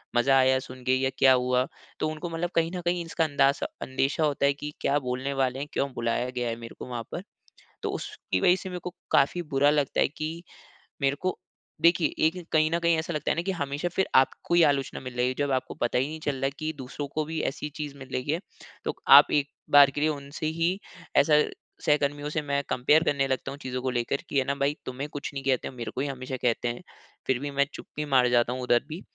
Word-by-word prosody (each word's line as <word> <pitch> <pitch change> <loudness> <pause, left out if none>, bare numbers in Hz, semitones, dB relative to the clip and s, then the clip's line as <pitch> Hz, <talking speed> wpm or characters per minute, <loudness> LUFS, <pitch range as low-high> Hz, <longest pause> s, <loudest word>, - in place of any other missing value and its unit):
मज़ा 135 +3 +4
आया 130 0 +5
सुनके 130 -1 -2
या 130 0 +1
क्या 130 -1 +7
हुआ। 125 +1 +2 0.3
तो - - +1
उनको 155 +3 -5
मतलब 165 +1 -2
कहीं 165 0 +2
न 180 - -3
कहीं 175 0 +1
इसका 165 0 0
अंदाज़ा 140 -2 +2
अंदेशा 135 +4 0
होता 145 -2 +1
है 140 - +4
कि 150 +1 -7
क्या 140 +1 +2
बोलने 130 +1 -3
वाले 135 -1 0
हैं 145 - -4
क्यों 140 - 0
बुलाया 120 +1 -1
गया 125 -1 -2
है 115 - -2
मेरे 115 0 -9
को - - -6
वहाँ 120 -2 -4
पर। - - -5 0.6
तो - - -1
उसकी 95 - -3
वजह 180 - +5
से 190 0 -7
मेरे 180 -1 -5
को 180 - -5 0.2
काफ़ी 145 +6 +3
बुरा 145 +2 +5
लगता 145 -2 +1
है - - +5
कि 160 +3 -5 0.6
मेरे 140 0 +2
को 185 0 -1 0.4
देखिए 170 0 +5 0.2
एक 175 +1 -5
कहीं 155 0 +4
न 170 - +1
कहीं 170 -1 +3
ऐसा 165 +2 -3
लगता 150 - -1
है - - +1
ना 165 - 0
कि 195 - -1
हमेशा 145 -1 -2
फिर 190 - +2
आपको 135 +5 +3
ही 175 - +6
आलोचना 140 -3 +1
मिल 125 -1 -8
रही 125 - +2
है। 130 - 0
जब 145 -1 0
आपको 130 -1 -1
पता 120 - +1
ही 130 +2 +1
नहीं 160 +1 -6
चल 145 -2 -2
रहा 135 0 -2
है 135 - +1
कि 155 0 -2
दूसरों 140 +2 -6
को 155 0 0
भी 160 +1 -3
ऐसी 150 +2 -6
चीज़ 145 -2 -5
मिल 135 -1 -10
रही 130 +3 -1
है 165 - 0 0.5
तो - - -2 0.2
आप - - +7
एक 145 -1 +2 0.2
बार 145 -1 +9
के 145 - -4
लिए 155 - +3
उनसे 145 0 -5 0.2
ही 180 +4 +2 0.4
ऐसा 150 +1 +6 0.4
सहकर्मियों 145 0 +1
से 155 - -1
मैं 140 -1 -1
कंपेयर 150 +6 +4
करने 140 -4 +1
लगता 135 0 -2
हूँ 140 - -7
चीज़ों 130 -1 -4
को 130 - -1
लेकर 120 +3 -1
कि 140 - -1
है 135 - +2
ना 140 - 0
भाई 140 +1 0
तुम्हें 130 +3 -4
कुछ 145 -1 -5
नहीं 135 -1 -5
कहते 130 -2 0
मेरे 120 -3 -6
को 130 - -1
ही 145 - -1
हमेशा 130 -1 -5
कहते 120 0 +1
है। 120 +5 -3 0.5
फिर 130 -2 +2
भी 145 +2 -4
मैं 140 0 +2
चुप्पी 150 0 -6
मार 130 -3 +4
जाता 120 0 +3
हूँ 130 - -4
उधर 120 -1 +2
भी। 160 +4 -6
140 Hz, 245 wpm, -27 LUFS, 130-155 Hz, 0.6 s, बार